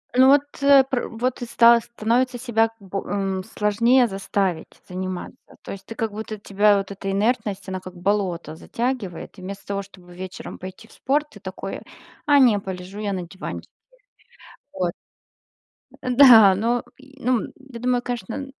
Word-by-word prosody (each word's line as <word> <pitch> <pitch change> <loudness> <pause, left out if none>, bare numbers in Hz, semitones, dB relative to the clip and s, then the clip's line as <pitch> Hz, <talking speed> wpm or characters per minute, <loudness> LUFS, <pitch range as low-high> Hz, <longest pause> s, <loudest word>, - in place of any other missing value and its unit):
Ну, 260 +1 +7
вот, 280 +1 +7 0.2
э, 280 -1 +7
пр 250 -2 -1
вот 245 +3 -3
и - - -2
стало 235 0 +6
становится 240 +2 -1
себя 225 -2 +1
б 195 -1 -6
э, 195 -2 -2
сложнее 235 +5 +3
заставить 195 -4 -2
заниматься, 185 0 -5 0.2
то - - -8
есть 195 -1 -8
ты - - -8
как 225 -1 -2
будто, 215 0 -6
тебя 205 +1 +3
вот 195 0 -3
эта 195 0 -4
инертность, 205 -2 -1
она 185 0 -3
как 185 0 -10
болото 180 -4 -1
затягивает. 230 -2 -4
И - - -11
вместо 195 +2 -8
того, 200 0 -2
чтобы 185 -2 -16
вечером 185 0 -8
пойти 185 +4 -10
в - - -22
спорт, 295 +3 0
ты - - -14
такой: - - -6 0.4
"А, 290 -1 +5
не, 240 -6 +6
полежу 190 +1 -7
я 205 -2 -2
на 180 -2 -4
диванчике". 185 +3 -8 1.0
Вот. 180 -9 -1 1.1
Да 245 -6 +8
но 235 +5 0
й 270 0 -18
ну, 245 -2 +1
я 265 -3 -11
думаю, 245 0 +1
конечно, 245 +3 -4
210 Hz, 165 wpm, -23 LUFS, 190-245 Hz, 1.1 s, Да